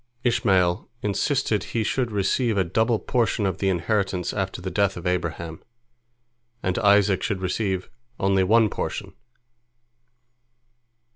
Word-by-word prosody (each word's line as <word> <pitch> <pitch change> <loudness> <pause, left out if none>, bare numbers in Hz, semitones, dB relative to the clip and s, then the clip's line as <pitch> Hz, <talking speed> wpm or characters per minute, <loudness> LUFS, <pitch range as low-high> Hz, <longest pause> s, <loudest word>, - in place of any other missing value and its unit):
Ishmael 95 -7 +2
insisted 105 0 0
he 110 +2 -2
should 125 +2 0
receive 105 +3 +1
a 95 - +3
double 110 +6 +1
portion 115 -2 0
of 95 -1 -1
the 95 - +1
inheritance 95 0 -1
after 95 -2 -3
the 95 +1 -5
death 100 -2 +1
of 85 - -8
Abraham, 85 -2 -2 1.0
and 90 0 0
Isaac 100 -2 +4
should 100 - -1
receive 95 0 -1 0.3
only 95 0 +3
one 110 +3 +4
portion. - - -4
100 Hz, 125 wpm, -24 LUFS, 90-110 Hz, 1.0 s, Isaac